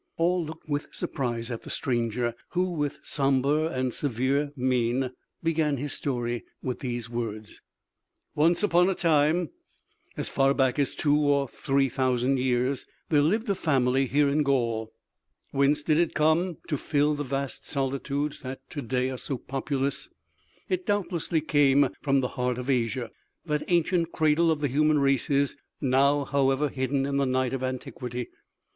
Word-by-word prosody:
All 175 +1 +2
looked 160 0 -9
with 145 -1 -2
surprise 120 -3 -3
at 115 - -4
the - - -11
stranger, 120 -1 -1 0.2
who 180 +1 +1
with 150 -4 -2
somber 140 +3 +1
and 130 -5 -2
severe 140 +2 0
mien 125 0 0 0.3
began 160 -3 +1
his 145 +2 -3
story 120 -3 -2 0.2
with 125 -1 -3
these 120 -2 -4
words: 110 -3 -5 0.7
"Once 165 +5 +3
upon 180 -2 +4
a 190 - 0
time, 160 -1 +2 0.7
as - - -1
far 135 0 +2
back 135 0 +2
as 140 - +1
two 145 -1 +2
or 145 -2 +2
three 135 +2 +1
thousand 130 0 +1
years, 125 +1 0 0.3
there 150 -3 +4
lived 215 +10 +1
a 200 - +2
family 135 -6 +1
here 145 +3 +3
in 145 +2 +2
Gaul. 115 -6 0 0.6
Whence 140 +2 +2
did 155 0 +2
it 170 -2 +1
come, 160 +2 +2
to 150 -4 -1
fill 150 0 +1
the 145 0 -2
vast 135 0 -4
solitudes 140 +1 -2
that 130 +1 -8
to 145 - -4
day 130 +1 -1
are 130 - -5
so 135 - -3
populous? 135 +2 -3 0.6
It 370 -1 -2
doubtlessly 175 -5 0
came 145 -2 +4
from 140 -2 +2
the 125 - -1
heart 125 -1 -1
of 125 +2 -1
Asia, 120 -1 -1 0.3
that 150 -2 0
ancient 170 0 +2
cradle 160 +2 +3
of 155 -2 +1
the 145 - +2
human 150 +3 +3
races, 140 0 +1 0.2
now, 140 +1 +3
however, 135 +1 +1
hidden 135 +1 -1
in 140 0 -1
the 140 -1 +2
night 130 0 0
of 135 - -2
antiquity. 125 -1 -4
140 Hz, 160 wpm, -27 LUFS, 130-150 Hz, 0.7 s, upon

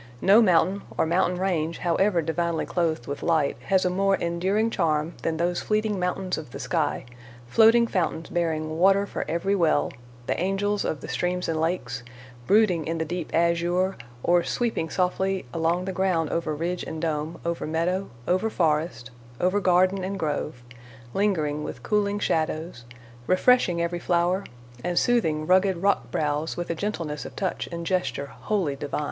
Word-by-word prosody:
No 200 - +6
mountain 185 0 +3 0.2
or - - +3
mountain 180 +2 +1
range, 170 -4 0
however 175 0 +1
divinely 165 +1 -1
clothed 160 -8 -1
with 140 - -5
light, 160 -4 +1
has 190 -1 +2
a - - +3
more 195 +1 +2
enduring 190 +7 0
charm 160 -3 0
than 160 -1 -1
those 175 +1 0
fleeting 215 -2 0
mountains 180 0 -1
of 155 - -9
the 135 - -8
sky—floating 130 - +1
fountains 170 -6 -1
bearing 160 -2 -1
water 195 +2 +5
for - - -4
every 170 +5 0
well, 165 -6 +2 0.3
the - - -1
angels 195 +2 0
of 150 - -2
the - - -7
streams 180 +7 -1
and 160 -1 -1
lakes; 160 -8 -2 0.5
brooding 195 -7 +3
in 165 +1 -1
the 160 - -1
deep 175 0 -4
azure, 170 +3 +1 0.3
or 175 0 +3
sweeping 225 -9 -1
softly 190 +2 0
along 165 +2 0
the 190 - -3
ground 180 -4 0
over 160 -2 -1
ridge 175 +3 -2
and 160 +1 -6
dome, 155 +1 -2
over 170 -2 -2
meadow, 175 +5 -1 0.2
over 185 +5 +2
forest, 155 - 0 0.3
over 185 +3 +2
garden 185 0 +3
and 195 +1 -3
grove; 150 -6 -3 0.5
lingering 155 -8 0
with - - -7
cooling 205 -1 +1
shadows, 160 -8 -2 0.4
refreshing 185 -2 +4
every 170 +1 -1
flower, 175 +2 +1 0.4
and 175 -1 -2
soothing 160 -11 +2
rugged 185 +1 +3
rock 190 -9 +1
brows 150 +3 -1
with 175 -1 -3
a - - +1
gentleness 165 -5 -3
of - - -9
touch 190 - -2
and 170 0 -5
gesture 180 -5 -1
wholly 175 -1 -2
divine. 140 +1 -4
175 Hz, 165 wpm, -25 LUFS, 160-190 Hz, 0.5 s, No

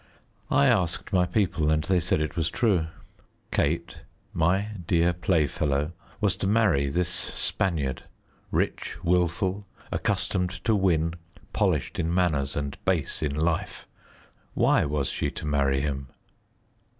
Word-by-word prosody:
I 70 +1 +4
asked 90 +5 +1
my 90 -1 +3
people, 90 -5 +1
and 75 0 +2
they 95 0 +2
said 85 -2 0
it 75 - -2
was 80 -1 0
true. 95 -9 +1 0.6
Kate, 85 +3 -1 0.3
my 95 +5 +2 0.2
dear 85 0 +3
playfellow, 75 -4 0 0.3
was 105 -3 +2
to 95 - -1
marry 100 -10 +3
this 85 +4 0
Spaniard, 80 -5 -2 0.4
rich, - - -1
wilful, 90 +3 +1 0.2
accustomed 90 0 -1
to 115 - +3
win, 85 -4 +2 0.4
polished - - 0
in 85 -1 0
manners 80 -7 +1
and 70 -1 -4
base - - 0
in 75 -2 -1
life. 80 +2 -1 0.7
Why - - +3
was 75 -2 -1
she - - -1
to - - -7
marry 70 -2 +2
him? 70 -2 -3
85 Hz, 130 wpm, -26 LUFS, 75-90 Hz, 0.7 s, I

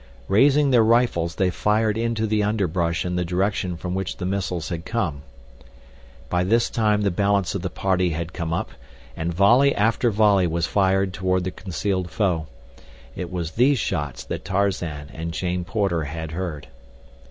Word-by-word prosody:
Raising 140 +6 +4
their 120 -3 +5
rifles 110 -8 +2
they 95 -2 +1
fired 105 +2 +1
into 115 -1 -1
the 110 0 +1
underbrush 90 -6 0
in 90 0 -2
the 90 - +1
direction 90 0 -1
from 90 +2 -4
which 95 -1 -3
the 90 - -4
missiles 95 -4 -2
had 85 -2 -4
come. 90 -12 -2 1.1
By 90 0 0
this 115 +5 +2
time 105 -2 +1
the 100 - +2
balance 100 0 +1
of 100 - -3
the 90 - -3
party 90 -1 0
had 85 +1 -4
come 85 -3 -4
up, 85 - -2 0.4
and 80 +2 -2
volley 120 +11 +4
after 115 +3 +2
volley 100 -4 +3
was 85 0 0
fired 95 -1 +1
toward 95 -1 0
the 95 - -3
concealed 95 0 -3
foe. 85 -5 0 0.7
It 90 -1 -5
was 85 -3 -3
these 130 - +3
shots 75 - -3
that - - -5
Tarzan 90 -7 -2
and 85 +1 -5
Jane 90 +1 -2
Porter 95 -5 0
had 80 +1 -5
heard. 85 -5 -5
95 Hz, 170 wpm, -23 LUFS, 85-105 Hz, 1.1 s, their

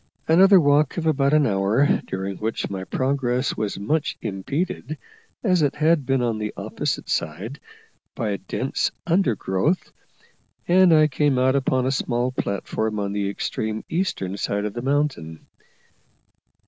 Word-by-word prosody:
Another 190 +4 +7
walk 145 -2 +3
of 165 - -2
about 140 -3 +2
an 150 -1 +4
hour, 105 +6 +2
during 95 0 -4
which 110 -1 -3
my 95 -1 -4
progress 130 0 -1
was 105 -2 -3
much 140 +10 -1
impeded, 140 - -3 0.5
as 185 -6 +3
it 145 -2 +1
had 155 -2 +2
been 135 -2 +1
on 115 -2 -1
the 105 0 -3
opposite - - -3
side, 100 - -3 0.6
by 110 -2 -2
the 100 - -1
dense 135 - -2 0.2
undergrowth, 165 - 0 0.8
and 185 0 +5
I 155 -1 +6
came 145 -1 +1
out 130 +1 +3
upon 130 -2 +1
a 130 - +1
small 125 -1 -1
platform 110 -1 -2
on 100 -1 -2
the 100 -1 -1
extreme 110 +2 -3
eastern 100 - -2
side 100 +1 -1
of 105 - -3
the 120 - -4
mountain. 135 - -2
130 Hz, 150 wpm, -23 LUFS, 105-150 Hz, 0.8 s, Another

